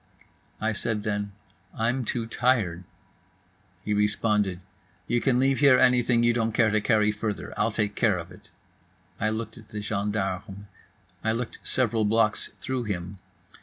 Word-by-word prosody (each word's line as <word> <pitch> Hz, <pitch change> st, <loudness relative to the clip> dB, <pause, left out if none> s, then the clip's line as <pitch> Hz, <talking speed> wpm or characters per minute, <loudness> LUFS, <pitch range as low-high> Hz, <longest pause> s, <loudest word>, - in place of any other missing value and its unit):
I 110 Hz, 0 st, 0 dB
said 105 Hz, 0 st, -2 dB
then: 105 Hz, -1 st, -2 dB, 0.5 s
"I'm 120 Hz, +3 st, 0 dB
too 115 Hz, +1 st, -2 dB
tired." 110 Hz, -7 st, 0 dB, 1.0 s
He 105 Hz, -, 0 dB
responded: 105 Hz, -2 st, +1 dB, 0.5 s
"You 120 Hz, 0 st, 0 dB
can 130 Hz, -3 st, +2 dB
leave 135 Hz, +1 st, +2 dB
here 140 Hz, -3 st, +6 dB
anything 125 Hz, -2 st, +4 dB
you 120 Hz, 0 st, +4 dB
don't 115 Hz, -1 st, 0 dB
care 110 Hz, -1 st, +3 dB
to 110 Hz, 0 st, +2 dB
carry 105 Hz, -2 st, +3 dB
further; 105 Hz, -1 st, -4 dB
I'll 105 Hz, +2 st, +1 dB
take 105 Hz, -1 st, -1 dB
care 105 Hz, -3 st, +2 dB
of 85 Hz, +1 st, -7 dB
it." -, -, -16 dB, 0.7 s
I 110 Hz, -, +1 dB
looked 110 Hz, +2 st, -4 dB
at 110 Hz, -, -17 dB
the 105 Hz, -, -5 dB
gendarme. 100 Hz, -1 st, -3 dB, 0.6 s
I 110 Hz, -, +1 dB
looked 115 Hz, 0 st, -4 dB
several 115 Hz, -3 st, +1 dB
blocks 110 Hz, +1 st, +2 dB
through 130 Hz, -2 st, -2 dB
him. 95 Hz, -1 st, -4 dB
110 Hz, 155 wpm, -26 LUFS, 105-120 Hz, 1.0 s, here